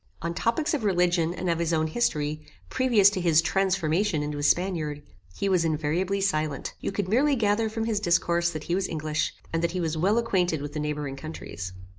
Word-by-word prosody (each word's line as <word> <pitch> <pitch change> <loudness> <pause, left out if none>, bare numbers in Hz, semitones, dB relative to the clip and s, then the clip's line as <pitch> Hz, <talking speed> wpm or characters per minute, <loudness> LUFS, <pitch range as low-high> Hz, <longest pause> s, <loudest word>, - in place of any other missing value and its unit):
On 170 0 -2
topics 300 - 0
of 285 -7 -1
religion 175 -4 +2
and 180 +1 -4
of 170 -1 +1
his 170 -1 0
own 160 -1 +2
history, 155 -5 -1 0.3
previous 230 -6 +4
to 190 - -3
his 165 -3 +4
TRANSFORMATION 180 -1 +1
into 150 0 -4
a - - -3
Spaniard, 155 -2 0 0.3
he 200 - -1
was 185 -3 +3
invariably 165 +5 0
silent. 155 -7 -1
You - - -3
could 200 -1 -2
merely 270 +8 +3
gather 220 -1 +1
from 225 +1 -3
his 220 -3 0
discourse 170 -2 +2
that 155 -3 -6
he 170 - -2
was 190 +1 0
English, 155 -1 -2 0.2
and 165 - +1
that 170 0 0
he 185 - -2
was 165 -2 -1
well 195 +7 +2
acquainted 180 -8 +1
with 145 +1 -6
the 155 - -3
neighbouring 150 -2 -3
countries. 115 - -7
170 Hz, 205 wpm, -26 LUFS, 155-200 Hz, 0.3 s, previous